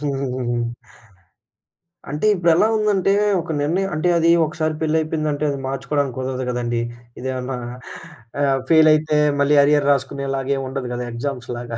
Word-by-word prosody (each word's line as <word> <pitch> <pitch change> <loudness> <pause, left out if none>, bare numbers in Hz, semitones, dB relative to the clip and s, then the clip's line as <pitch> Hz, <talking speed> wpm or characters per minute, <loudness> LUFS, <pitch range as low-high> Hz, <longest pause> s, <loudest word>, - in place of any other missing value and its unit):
హుహుహు. 130 -4 -2 1.5
అంటే 150 +7 -2
ఇప్పుడెలా 175 +4 +3
ఉందంటే 205 -3 +1 0.3
ఒక 165 0 -6
నిర్ణయం 185 +7 0
అంటే 155 +3 +1
అది 165 0 +3 0.2
ఒకసారి 155 0 -2
పెళ్లయిపోయిందంటే 155 -1 -1
అది 140 -1 -3
మార్చుకోడానికి 135 -1 -2
కుదరదు 130 0 -3
కదండీ. 120 -1 -1 0.4
ఇదేమన్నా 130 0 -4 0.9
ఆహ్, 135 -1 +2
ఫెయిలయితే 155 -1 +4 0.2
మళ్ళీ 145 +1 +3
అరియర్ 145 0 +3
రాసుకునేలాగా 135 0 -1
ఏముండదు 130 -1 -4
కదా 125 0 -4
ఎగ్జామ్స్‌లాగా. 120 -2 -5
140 Hz, 115 wpm, -21 LUFS, 130-155 Hz, 1.5 s, ఫెయిలయితే